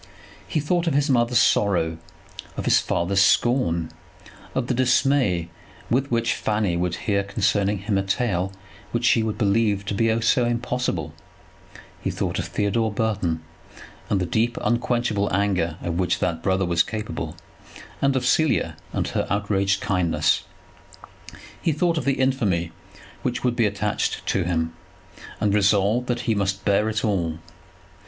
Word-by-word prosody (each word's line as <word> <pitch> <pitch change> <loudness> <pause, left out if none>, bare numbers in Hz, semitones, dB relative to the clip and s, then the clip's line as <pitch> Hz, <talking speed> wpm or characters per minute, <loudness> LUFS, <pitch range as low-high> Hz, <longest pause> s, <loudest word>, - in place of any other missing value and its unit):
He 155 - -1
thought 170 +4 0
of 155 - +1
his 145 0 +2
mother's 120 -1 +3
sorrow, 85 -7 +2 0.6
of - - -3
his - - +5
father's 95 +3 +1
scorn, 90 -7 +2 0.6
of 130 - 0
the 125 - -1
dismay 125 -8 +2 0.4
with 135 +3 +1
which 115 -1 +1
Fanny 105 -4 0
would 90 0 -1
hear 100 -2 +1
concerning 100 0 +1
him 100 +1 -1
a - - +1
tale 95 -2 -1 0.4
which 120 0 0
she 115 0 +4
would 110 -1 -2
believe 105 -1 +1
to 105 - -2
be 115 +2 +2
so 120 +2 +3
impossible; 120 -8 -2 0.9
he - - -1
thought - - -2
of - - -3
Theodore 105 +2 0
Burton, 100 -7 -1 0.7
and 100 - +2
the 90 - 0
deep, 115 +7 0
unquenchable 120 -3 0
anger 90 -4 0
of 85 0 -2
which 90 - +1
that 85 -2 -1
brother 95 +1 +1
was 85 -1 +2
capable, 105 -7 -4 0.7
and 140 -1 +2
of 130 -1 0
Cecilia 130 - +2 0.2
and - - -1
her - - -1
outraged 100 -1 +1
kindness; 90 -4 +1 1.2
he 165 - +1
thought 165 +2 +1
of - - -6
the 140 - +3
infamy 105 -11 +1 0.5
which 125 -2 -2
would 125 -1 +1
be 115 -3 +3
attached 105 +1 -2
to 95 - 0
him, 80 -2 -1 0.7
and 105 -2 +1
resolved 105 +4 +2
that 120 -1 -1
he 115 - 0
must 95 -2 -1
bear 105 +2 +2
it 110 0 -1
all. 85 -6 0
105 Hz, 155 wpm, -23 LUFS, 95-120 Hz, 1.2 s, his